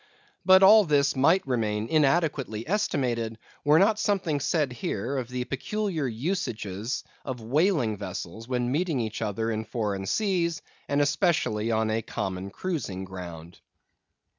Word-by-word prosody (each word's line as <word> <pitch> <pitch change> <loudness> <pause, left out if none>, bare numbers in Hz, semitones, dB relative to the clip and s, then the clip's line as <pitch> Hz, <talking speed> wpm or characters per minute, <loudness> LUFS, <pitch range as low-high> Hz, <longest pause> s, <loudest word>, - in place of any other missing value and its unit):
But 190 0 +7
all 210 +2 +8
this 145 -3 +2
might 165 +8 +3
remain 110 -4 -1
inadequately 140 -7 +1
estimated, 125 - -1 0.3
were 150 +2 +5
not 210 +4 +4
something 185 -8 0
said 145 -2 0
here 120 +2 -3
of 125 -3 -3
the 125 0 -2
peculiar 165 +3 -2
usages 115 - -3 0.2
of 130 -3 -5
whaling 130 - +1
vessels 100 +2 -6
when 125 -1 -1
meeting 160 -1 0
each 110 -1 -3
other 110 +1 -1
in 110 0 -2
foreign 105 -4 -3
seas, 170 - 0 0.3
and 145 +1 +2
especially 145 - +1
on 110 -1 +1
a 110 +1 0
common 95 -2 -4
cruising 110 - -4
ground. 85 -3 -9
125 Hz, 140 wpm, -27 LUFS, 110-165 Hz, 0.3 s, all